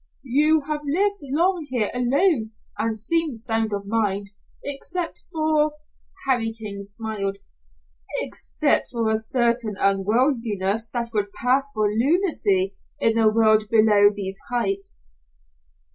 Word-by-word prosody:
"You 300 Hz, +5 st, +3 dB
have 300 Hz, +1 st, -4 dB
lived 395 Hz, +8 st, 0 dB
long 320 Hz, +4 st, 0 dB
here 240 Hz, -5 st, +1 dB
alone 250 Hz, -, +1 dB, 0.2 s
and 220 Hz, 0 st, -1 dB
seem 320 Hz, +5 st, +3 dB
sound 225 Hz, -1 st, -2 dB
of 200 Hz, -1 st, -3 dB
mind, 200 Hz, -2 st, -1 dB, 0.3 s
except 330 Hz, +5 st, -2 dB
for 310 Hz, -1 st, +1 dB, 0.2 s
" 385 Hz, -1 st, -20 dB
Harry 240 Hz, -4 st, +2 dB
King 210 Hz, -3 st, -7 dB
smiled, 200 Hz, -1 st, -4 dB, 0.8 s
"except -, -, +1 dB
for 230 Hz, -3 st, 0 dB
a 220 Hz, -, +2 dB
certain 235 Hz, -1 st, 0 dB
unworldliness 215 Hz, 0 st, +1 dB
that 235 Hz, 0 st, -4 dB
would 205 Hz, -2 st, -1 dB
pass 265 Hz, +3 st, +1 dB
for 215 Hz, -4 st, 0 dB
lunacy 220 Hz, -, +1 dB, 0.2 s
in 225 Hz, -, +3 dB
the 225 Hz, -1 st, +4 dB
world 215 Hz, -1 st, +3 dB
below 215 Hz, -2 st, +5 dB
these 195 Hz, -2 st, -5 dB
heights." 195 Hz, -, -2 dB
225 Hz, 125 wpm, -23 LUFS, 210-280 Hz, 0.8 s, below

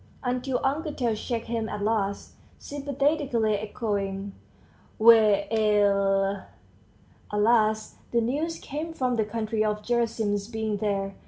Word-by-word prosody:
until 250 Hz, +1 st, -1 dB
Uncle 300 Hz, +4 st, 0 dB
Tail 245 Hz, -5 st, -1 dB
checked 230 Hz, +1 st, -3 dB
him 230 Hz, -1 st, -2 dB
at 210 Hz, -1 st, -4 dB
last, 205 Hz, -2 st, -1 dB, 0.3 s
sympathetically 280 Hz, -5 st, 0 dB
echoing 200 Hz, -2 st, -3 dB, 0.6 s
"We 230 Hz, +1 st, +9 dB, 0.4 s
ell!" 200 Hz, -2 st, +2 dB, 0.8 s
At 210 Hz, -, -1 dB
last 215 Hz, -1 st, +2 dB
the 235 Hz, -, +2 dB
news 290 Hz, +8 st, -1 dB
came 310 Hz, +4 st, -5 dB
from 255 Hz, -5 st, 0 dB
the 220 Hz, -2 st, +1 dB
country 215 Hz, 0 st, -1 dB
of 210 Hz, 0 st, -1 dB
Gerasim's 225 Hz, -4 st, 0 dB
being 220 Hz, -2 st, -2 dB
there. 200 Hz, -2 st, -1 dB
220 Hz, 120 wpm, -26 LUFS, 205-245 Hz, 0.8 s, We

